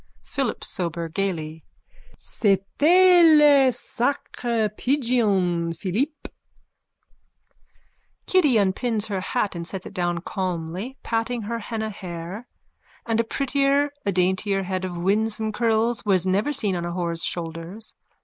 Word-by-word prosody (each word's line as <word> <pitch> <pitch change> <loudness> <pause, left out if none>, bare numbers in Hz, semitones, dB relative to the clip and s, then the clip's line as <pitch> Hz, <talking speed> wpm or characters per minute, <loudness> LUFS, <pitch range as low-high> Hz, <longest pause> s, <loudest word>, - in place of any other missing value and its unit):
_ - - -39 0.2
PHILIP 270 -5 -3
SOBER: 170 -2 -2
(Gaily.) 160 -4 -3 0.5
C'était 320 - +4
le 285 -3 +6
sacré 240 -2 -2
pigeon, 205 - +1
Philippe. 260 - -2 2.0
_(Kitty 315 -9 +3
unpins 210 +3 0
her 195 -2 -2
hat 210 +1 -1
and 170 -1 -3
sets 190 0 -4
it - - -9
down 175 -1 -1
calmly, 185 +6 -4
patting 230 0 -2
her 230 +3 -3
henna 220 0 -4
hair. 185 +3 -7 0.6
And 225 -1 0
a - - +4
prettier, 275 +4 +1
a 200 - 0
daintier 190 +2 +1
head 185 0 -3
of 180 -2 -5
winsome 215 +4 0
curls 230 +1 +1
was 190 -4 +2
never 200 +9 +1
seen 215 -9 +1
on 175 - -3
a 175 0 -4
whore's 170 -2 -1
shoulders. 170 +5 -5
205 Hz, 125 wpm, -24 LUFS, 180-245 Hz, 2.0 s, le